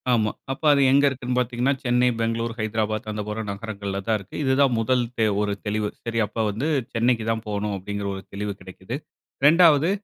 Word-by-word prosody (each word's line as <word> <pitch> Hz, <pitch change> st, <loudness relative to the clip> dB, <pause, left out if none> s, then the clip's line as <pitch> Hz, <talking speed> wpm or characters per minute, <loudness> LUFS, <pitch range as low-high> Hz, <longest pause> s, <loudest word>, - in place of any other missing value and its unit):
ஆமா, 110 Hz, -3 st, +2 dB, 0.2 s
அப்ப 135 Hz, -, -5 dB
அது 140 Hz, -, +3 dB
எங்க 140 Hz, +1 st, +5 dB
இருக்குன்னு 125 Hz, -1 st, -3 dB
பாத்தீங்கன்னா, 125 Hz, +2 st, +1 dB
சென்னை, 125 Hz, 0 st, +3 dB
பெங்களூர், 115 Hz, 0 st, -1 dB
ஹைதராபாத், 110 Hz, 0 st, -1 dB
அந்த 105 Hz, 0 st, -3 dB
போற 105 Hz, +1 st, -3 dB
நகரங்கள்ல 100 Hz, -1 st, -4 dB
தான் 110 Hz, -, +3 dB
இருக்கு. 100 Hz, -, -12 dB
இது 130 Hz, -1 st, +2 dB
தான் 135 Hz, -3 st, +4 dB
முதல் 125 Hz, +2 st, +2 dB
தே 110 Hz, -, +3 dB, 0.2 s
ஒரு 105 Hz, -1 st, 0 dB
தெளிவு. 105 Hz, 0 st, -1 dB, 0.2 s
சரி 115 Hz, 0 st, -1 dB
அப்ப 105 Hz, -, -12 dB
வந்து 110 Hz, +9 st, -2 dB, 0.3 s
சென்னைக்கு 115 Hz, -1 st, +1 dB
தான் 110 Hz, 0 st, -2 dB
போணும் 105 Hz, 0 st, -2 dB
அப்டிங்குற 100 Hz, +1 st, -4 dB
ஒரு 95 Hz, -, -8 dB
தெளிவு 100 Hz, +1 st, -3 dB
கெடைக்குது. 95 Hz, +5 st, -8 dB, 0.5 s
2வது 160 Hz, 0 st, +6 dB
115 Hz, 185 wpm, -24 LUFS, 105-125 Hz, 0.5 s, 2வது